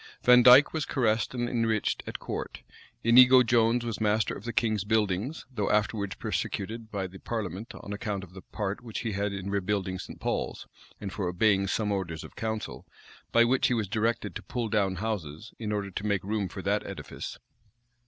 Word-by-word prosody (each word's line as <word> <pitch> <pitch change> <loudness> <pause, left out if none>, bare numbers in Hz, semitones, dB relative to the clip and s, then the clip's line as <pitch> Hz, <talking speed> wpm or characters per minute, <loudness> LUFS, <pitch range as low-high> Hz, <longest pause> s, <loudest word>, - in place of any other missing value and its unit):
Vandyke 125 +3 +8
was 160 -2 -1
caressed 110 -4 0
and 120 -1 -1
enriched 115 -3 0
at - - -4
court. - - -6 0.4
Inigo 125 +2 +8
Jones 120 0 +3
was 115 -2 -4
master 105 0 +2
of 100 - -9
the 120 - -2
king's 110 -4 +1
buildings; 110 - 0
though 105 -4 -1
afterwards 105 -1 0
persecuted 110 +3 -3
by 100 -2 -2
the 95 +1 -9
parliament, 105 -2 -5
on 100 - -7
account 100 -1 -3
of 90 -1 -13
the 95 - -10
part 105 +3 -4
which 115 -3 -5
he 115 - -2
had 100 +1 -1
in 100 0 -5
rebuilding 100 -1 -1
St. - - -9
Paul's, - - -2 0.3
and 95 -2 -6
for 90 0 -2
obeying 95 +2 +2
some 105 +1 0
orders 85 -5 -3
of - - -12
council, 110 -1 -4 0.4
by 115 - +6
which 125 +2 +3
he 125 - +1
was 110 -3 -1
directed 110 +3 -1
to - - -6
pull 120 -3 -3
down 100 -3 +1
houses, 95 -3 -4
in 110 -2 -3
order 100 -2 -2
to 105 +3 -4
make 100 -2 0
room 100 -1 -1
for 95 +1 -7
that 105 +1 +1
edifice. 100 - -7
105 Hz, 190 wpm, -28 LUFS, 100-115 Hz, 0.4 s, Vandyke